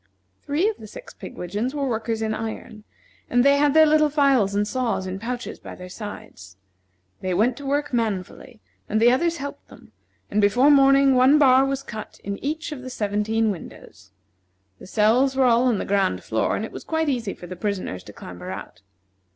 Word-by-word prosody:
Three 305 +8 0
of 435 -1 -2
the - - -11
six - - -11
pigwidgeons 210 - -5
were 280 -2 -1
workers 225 -1 -2
in 220 0 -1
iron, 220 -1 -6 0.4
and 245 +1 +3
they 280 0 +5
had 290 0 +2
their 315 0 +8
little 305 0 +4
files 275 -9 +2
and 205 0 +1
saws 240 -6 -1
in 190 +1 -5
pouches 245 +2 -5
by - - -10
their 180 0 -10
sides. 100 - -10 0.6
They 185 -1 -2
went 230 +6 +2
to 285 - -7
work 290 0 -1
manfully, 220 +1 -3 0.3
and 215 - +1
the 235 +2 +5
others 335 +6 +1
helped 285 0 -7
them, - - -17 0.4
and 210 - +2
before 245 +8 +4
morning 275 -1 +5
one 260 +3 +5
bar 265 -2 +5
was 275 0 -3
cut 215 -4 -9
in 200 0 -5
each 310 +3 -3
of 290 -4 -6
the 255 - -7
seventeen 215 0 0
windows. 95 - -11 0.7
The - - -12
cells 235 +7 +2
were 265 -1 +3
all 240 0 +4
on 240 -4 +2
the - - -3
ground 195 - 0
floor, 110 0 0
and 220 - -3
it - - -10
was - - -9
quite 320 -1 -1
easy 240 -8 -2
for - - -11
the 185 +1 -7
prisoners 185 - -4
to - - -10
clamber 90 -1 -9
out. 95 0 -8
235 Hz, 200 wpm, -23 LUFS, 205-275 Hz, 0.7 s, their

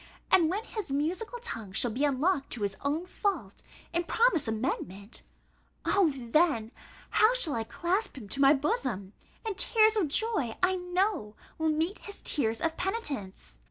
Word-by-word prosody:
And 340 -4 +5
when 400 +5 -1
his 420 -11 -6
musical 350 - -1
tongue 225 - -7
shall 235 +3 +2
be 265 +6 +1
unlocked 285 +2 +1
to 210 -4 0 0.2
own 290 +3 0
his 360 - -13
fault, 335 - -2 0.3
and 340 0 0
promise 450 - +3
amendment 215 -3 -3 0.6
O 390 -4 +4
then! 255 -2 +1 0.4
how 440 +3 +5
shall 340 -12 +4
I 225 - -1
clasp 355 - -1
him 220 -6 -8
to 275 - -2
my 275 0 +7
bosom! 265 - -1 0.3
and 435 -3 -2
tears 435 +3 +4
of 400 -7 +2
joy, 300 - 0
I 370 +1 +4
know, 360 - -1 0.2
will 320 0 +2
meet 320 +6 0
his 405 - -9
tears 225 -5 0
of 325 0 -1
penitence! 275 - -4
315 Hz, 160 wpm, -29 LUFS, 235-390 Hz, 0.6 s, my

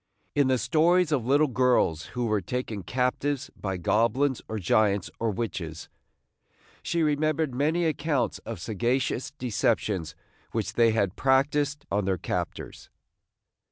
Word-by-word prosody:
In 145 -2 +3
the 130 -1 +3
stories 170 +4 +3
of 130 -6 0
little 145 +3 +4
girls 125 - +2
who 120 - 0
were 105 -3 +1
taken 110 +1 -4
captives 130 +6 -1
by 95 -2 -3
goblins 115 +9 +1
or 110 - -3
giants 105 -1 +1
or 115 - 0
witches, 90 -7 -4 0.9
she 170 -1 0
remembered 155 -1 +1
many 155 +6 +1
accounts 150 -3 0
of - - -7
sagacious 120 +6 -1
deceptions 110 -8 -1 0.4
which 105 -2 -2
they 115 +1 +4
had 100 -4 0
practised 140 +2 +1
on 100 0 +1
their 95 -1 0
captors. - - -5
125 Hz, 130 wpm, -27 LUFS, 105-145 Hz, 0.9 s, little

